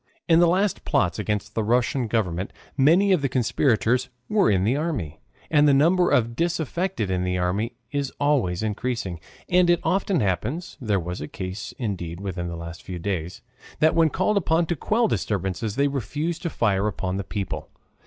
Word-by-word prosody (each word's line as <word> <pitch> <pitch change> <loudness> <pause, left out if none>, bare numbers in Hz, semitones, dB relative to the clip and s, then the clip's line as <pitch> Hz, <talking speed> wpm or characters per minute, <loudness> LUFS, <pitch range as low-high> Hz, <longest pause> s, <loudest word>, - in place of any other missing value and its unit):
In 165 -1 +5
the 175 - +6
last 190 +3 +1
plots - - +1
against 105 0 -2
the 110 - 0
Russian 120 +3 +1
Government 95 -5 -1 0.2
many 170 +9 +4
of 180 -5 +3
the 135 - 0
conspirators 125 0 +1 0.2
were 210 -3 +3
in 95 -2 +2
the 115 +6 +2
army. 140 - -3 0.3
And 150 -1 +5
the 140 - +5
number 175 +6 +4
of 115 -2 +3
the - - -10
disaffected 170 - -1
in 90 -1 0
the 90 0 0
army 90 +6 -1 0.2
is 140 -2 -2
always 125 -11 +1
increasing. 110 -4 -2 0.3
And 180 0 +4
it 175 -1 +4
often 195 -2 +1
happens 105 - -2
(there 105 -5 +1
was 90 0 -5
a 75 - -4
case, 95 +1 -6
indeed, 90 - -4
within 90 -3 -4
the 85 - -5
last 85 0 -8
few 90 -1 -6
days) 90 -1 -4 0.3
that 155 +1 +4
when 165 -1 +4
called 200 +6 +1
upon 165 -2 +2
to 170 - -1
quell 225 - +1
disturbances 100 - -2
they 140 +1 +3
refuse 145 +5 -2
to 170 - -3
fire 105 -7 +1
upon 95 -2 -2
the 100 - -2
people. 100 +1 -4
120 Hz, 185 wpm, -24 LUFS, -, 0.3 s, the